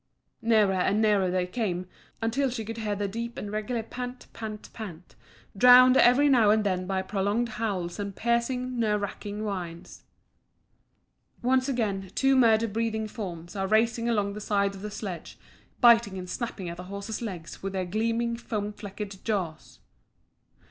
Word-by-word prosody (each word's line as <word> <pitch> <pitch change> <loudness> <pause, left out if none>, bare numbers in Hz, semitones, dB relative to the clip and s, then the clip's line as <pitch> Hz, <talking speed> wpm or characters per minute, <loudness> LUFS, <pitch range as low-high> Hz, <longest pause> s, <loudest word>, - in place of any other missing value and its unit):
Nearer 215 -4 +4
and 190 +3 +1
nearer 205 -4 +3
they 180 0 0
came, 185 -3 -2 0.4
until 260 +4 +1
she 235 -3 -4
could 225 +1 -6
hear 210 -2 -2
a 205 - 0
deep 235 +4 -5
and 205 - -5
regular 220 +2 -2
pant, 250 +2 -7
pant, 215 -2 -7
pant, 185 -6 -9 0.4
drowned 250 +4 +8
every 260 +4 +6
now 240 -7 +5
and 215 0 +4
then 185 -2 -1
by 190 0 -1
prolonged 205 +5 0
howls 200 -6 -3
and 200 -1 -4
piercing, 245 +1 0
nerve 210 -2 +2
racking 205 +1 -5
whines. 180 -5 -6 1.4
Once 260 +2 +2
again 200 -7 -1
two 270 0 +3
murder 230 -3 +5
breathing 220 0 -1
forms 175 -6 -7
are 195 -1 -1
racing 230 +2 +2
along 205 -3 +1
at - - -6
the 210 - -7
side 200 -1 +1
of 195 - -10
the 210 - -4
sledge, 195 -5 -6 0.4
biting 230 -5 +6
and 180 -1 -6
snapping 225 -6 -4
at 170 0 -6
the 180 - -8
horse's 200 +4 -5
legs 180 -8 -6
with 195 0 -4
their 190 -1 -1
gleaming, 230 +4 0
foam 210 -3 -4
flecked 205 -1 -8
jaws. 180 -8 -3
210 Hz, 165 wpm, -27 LUFS, 195-235 Hz, 1.4 s, drowned